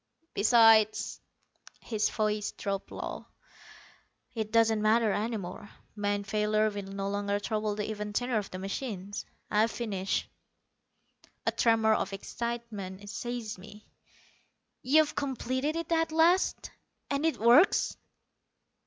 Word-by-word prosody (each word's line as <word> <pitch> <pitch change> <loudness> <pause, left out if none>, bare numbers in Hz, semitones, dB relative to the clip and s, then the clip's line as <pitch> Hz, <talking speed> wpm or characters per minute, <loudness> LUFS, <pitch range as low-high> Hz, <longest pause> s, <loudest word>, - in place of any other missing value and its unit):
Besides" 220 0 +4 0.6
his 215 -2 -1
voice 210 -1 -1
dropped 195 -1 -4
low - - -6 1.1
"it 220 -2 -3
doesn't 225 -1 +3
matter 220 0 +3
any 220 +3 -1
more. 195 +1 -8 0.3
Man 205 -1 -1
failure 215 +1 +1
will 205 -1 -5
no 195 0 -3
longer 200 0 -1
trouble 215 0 -2
the 210 0 -3
even 210 -1 -4
tenor 245 +1 0
of 205 - -7
the 185 - -6
machines. 200 0 -5 0.2
I've 215 +2 +3
finished." 200 -5 -2 1.2
A - - +2
tremor 225 -2 +3
of 195 -2 -1
excitement 205 -2 -5
seized 230 -3 -5
me. 210 +2 -13 1.0
"You've 300 +4 +3
completed 265 +2 -2
it 335 0 -4
at 325 -1 +2
last? 335 +4 +2 0.4
And 280 +1 0
it 325 -1 +1
works?" 240 - +5
215 Hz, 120 wpm, -29 LUFS, 205-235 Hz, 1.2 s, works